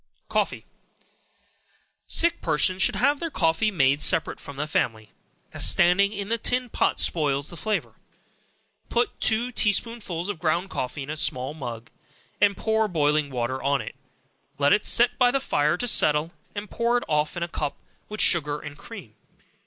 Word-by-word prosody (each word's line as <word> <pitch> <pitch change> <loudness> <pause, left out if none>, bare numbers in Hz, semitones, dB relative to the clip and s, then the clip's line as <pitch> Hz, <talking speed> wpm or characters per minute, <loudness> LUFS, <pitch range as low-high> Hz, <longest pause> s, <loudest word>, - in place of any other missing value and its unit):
Coffee. - - -2 1.4
Sick 340 0 +3
persons 180 +4 +1
should - - +3
have 290 0 +1
their 335 - -3
coffee 165 - +1
made 140 -6 +1
separate 160 - +2
from 140 - -10
the 150 - -2
family, 110 -7 -2 0.4
as - - +5
standing 185 +3 +4
in 200 -2 -5
the 230 +1 -1
tin 250 +2 0
pot - - 0
spoils 145 -3 0
the - - -9
flavor. 215 +5 -3 1.0
Put 240 0 -1
two 235 +3 +2
tea 210 -3 +3
spoonsful 200 -7 -3
of 205 -6 -5
ground 175 +3 -1
coffee 130 +3 -4
in 140 - -7
a - - -4
small 130 -2 -2
mug, 120 -6 -8 0.5
and 200 -1 +3
pour 220 0 0
boiling 150 -4 0
water 130 0 -3
on 140 0 +1
it; 110 - -7 0.6
let 145 0 +3
it 210 - +1
set 240 +3 +4
by 250 -1 +5
the 275 +2 0
fire 150 - 0
to 245 - -2
settle, 150 -6 +3 0.2
and 205 +1 -5
pour 235 +1 +1
it 240 - -3
off 150 +1 -1
in 170 - -2
a - - -3
cup, 150 -4 -4 0.3
with 215 0 -1
sugar 150 -4 +3
and 150 -1 -10
cream. 190 - -11
170 Hz, 175 wpm, -24 LUFS, 145-220 Hz, 1.4 s, as